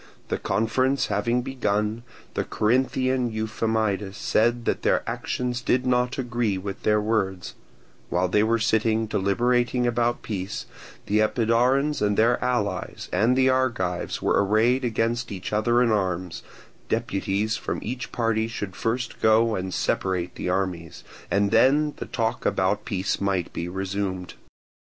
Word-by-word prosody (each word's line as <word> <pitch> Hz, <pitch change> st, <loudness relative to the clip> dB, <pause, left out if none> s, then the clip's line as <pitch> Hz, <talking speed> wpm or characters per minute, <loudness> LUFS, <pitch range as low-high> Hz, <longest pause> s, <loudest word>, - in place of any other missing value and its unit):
The -, -, -1 dB
conference 125 Hz, +6 st, +1 dB
having 120 Hz, +5 st, +1 dB
begun, 110 Hz, -4 st, -1 dB, 0.3 s
the -, -, -1 dB
Corinthian 130 Hz, +2 st, +1 dB
Euphamidas 110 Hz, -2 st, -1 dB
said 120 Hz, +2 st, +1 dB
that -, -, 0 dB
their -, -, +1 dB
actions 125 Hz, -1 st, -2 dB
did 125 Hz, +1 st, +1 dB
not 125 Hz, 0 st, +1 dB
agree 120 Hz, -6 st, -1 dB
with 95 Hz, +1 st, -6 dB
their 105 Hz, 0 st, +3 dB
words; 100 Hz, -4 st, -1 dB, 0.6 s
while 90 Hz, +1 st, +1 dB
they 105 Hz, +4 st, +2 dB
were 115 Hz, +2 st, +2 dB
sitting 110 Hz, 0 st, +1 dB
deliberating 120 Hz, +5 st, +1 dB
about 120 Hz, 0 st, 0 dB
peace, 95 Hz, -3 st, -4 dB, 0.4 s
the 105 Hz, +1 st, +1 dB
Epidaurians 125 Hz, +6 st, +2 dB
and 105 Hz, -1 st, +1 dB
their 115 Hz, +2 st, +3 dB
allies 100 Hz, -7 st, -2 dB
and 115 Hz, +8 st, +3 dB
the 130 Hz, 0 st, +4 dB
Argives 115 Hz, -9 st, -1 dB
were -, -, +3 dB
arrayed 115 Hz, +6 st, +2 dB
against 115 Hz, 0 st, -1 dB
each 95 Hz, +1 st, -5 dB
other 120 Hz, +3 st, +3 dB
in 115 Hz, -, +2 dB
arms; 90 Hz, -4 st, -1 dB, 0.5 s
deputies 105 Hz, -1 st, -1 dB
from -, -, -3 dB
each 125 Hz, +3 st, -5 dB
party 115 Hz, -2 st, 0 dB
should 105 Hz, -5 st, -5 dB
first 115 Hz, +1 st, -2 dB
go 110 Hz, +1 st, +4 dB
and 95 Hz, -2 st, -3 dB
separate 90 Hz, -1 st, -1 dB
the -, -, -4 dB
armies, 90 Hz, -3 st, -2 dB, 0.3 s
and 100 Hz, 0 st, +2 dB
then 150 Hz, +3 st, +4 dB
the -, -, -6 dB
talk 115 Hz, +2 st, -2 dB
about 95 Hz, +3 st, 0 dB
peace 95 Hz, 0 st, -2 dB
might 95 Hz, -3 st, -1 dB
be 85 Hz, +1 st, -4 dB
resumed. 95 Hz, 0 st, -3 dB
110 Hz, 140 wpm, -25 LUFS, 100-120 Hz, 0.6 s, the